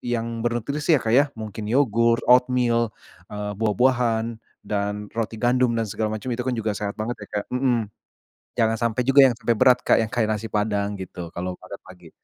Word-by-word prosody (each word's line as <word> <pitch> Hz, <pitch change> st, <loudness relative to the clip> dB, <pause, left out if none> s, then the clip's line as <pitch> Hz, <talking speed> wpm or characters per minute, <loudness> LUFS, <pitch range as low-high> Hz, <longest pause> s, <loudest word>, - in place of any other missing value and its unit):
yang 115 Hz, 0 st, -4 dB
bernutrisi 140 Hz, +7 st, +1 dB
ya, -, -, +1 dB
Kak, 110 Hz, -, 0 dB
ya. 140 Hz, +2 st, +6 dB
Mungkin 110 Hz, -1 st, -7 dB
yogurt, 115 Hz, -1 st, +2 dB
oatmeal, 125 Hz, -2 st, +3 dB, 0.4 s
eee, 105 Hz, 0 st, -4 dB
buah-buahan, 115 Hz, 0 st, +1 dB, 0.2 s
dan 105 Hz, 0 st, -3 dB
roti 115 Hz, 0 st, -2 dB
gandum, 125 Hz, 0 st, +2 dB
dan 115 Hz, -, 0 dB
segala 110 Hz, +2 st, -2 dB
macem 120 Hz, +4 st, -5 dB
itu 120 Hz, -, -6 dB
kan 130 Hz, -1 st, -1 dB
juga 110 Hz, -2 st, -1 dB
sehat 100 Hz, 0 st, -4 dB
banget 110 Hz, +3 st, -3 dB
ya, -, -, -27 dB
Kak, -, -, -15 dB
mhm. 125 Hz, -4 st, 0 dB, 0.7 s
Jangan 115 Hz, -1 st, +3 dB
sampai 115 Hz, +3 st, -2 dB
juga 135 Hz, +1 st, +7 dB
yang -, -, -5 dB
sampai 115 Hz, -, +1 dB
berat, 125 Hz, +3 st, +5 dB
Kak, -, -, +4 dB
yang 110 Hz, -, -6 dB
kayak 120 Hz, -4 st, 0 dB
nasi 110 Hz, +2 st, -5 dB
Padang 105 Hz, -1 st, -1 dB
gitu 90 Hz, -2 st, -7 dB
kalau 90 Hz, +1 st, -4 dB
makan 95 Hz, +2 st, -10 dB
pagi. 90 Hz, -3 st, -14 dB
115 Hz, 190 wpm, -23 LUFS, 105-125 Hz, 0.7 s, juga